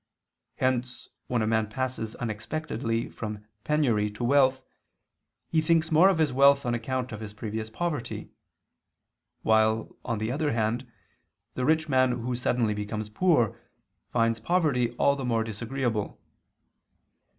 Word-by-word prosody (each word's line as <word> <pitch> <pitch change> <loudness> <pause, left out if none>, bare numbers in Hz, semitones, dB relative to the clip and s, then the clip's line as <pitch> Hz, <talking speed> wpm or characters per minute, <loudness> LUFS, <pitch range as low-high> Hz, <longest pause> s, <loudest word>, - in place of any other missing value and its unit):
Hence, 125 -1 -1 0.2
when 120 -3 0
a - - +1
man 110 0 +1
passes 120 -2 -3
unexpectedly 115 +1 -3
from 105 -1 -7 0.2
penury 120 -9 +2
to 120 - -5
wealth, 130 0 +3 0.9
he 160 - +3
thinks 160 0 +2
more 165 +5 +7
of 190 - +2
his 155 -5 +2
wealth 140 +1 +5
on 120 - 0
account 125 +2 -2
of 110 - -6
his 110 -2 -7
previous 110 0 -4
poverty: 150 +1 -4 1.1
while, 110 0 +2
on 115 -3 -2
the 110 +2 -2
other 150 +1 0
hand, 115 +2 -1 0.6
the 125 - -2
rich 160 +2 +2
man 130 -3 +3
who 125 +1 -3
suddenly 120 -2 +1
becomes 105 +1 -4
poor, 135 - +2 0.6
finds 115 -1 +2
poverty 140 -3 +1
all 140 +3 +3
the 135 - -5
more 115 -2 +1
disagreeable. 115 0 -3
120 Hz, 140 wpm, -27 LUFS, 110-140 Hz, 1.1 s, more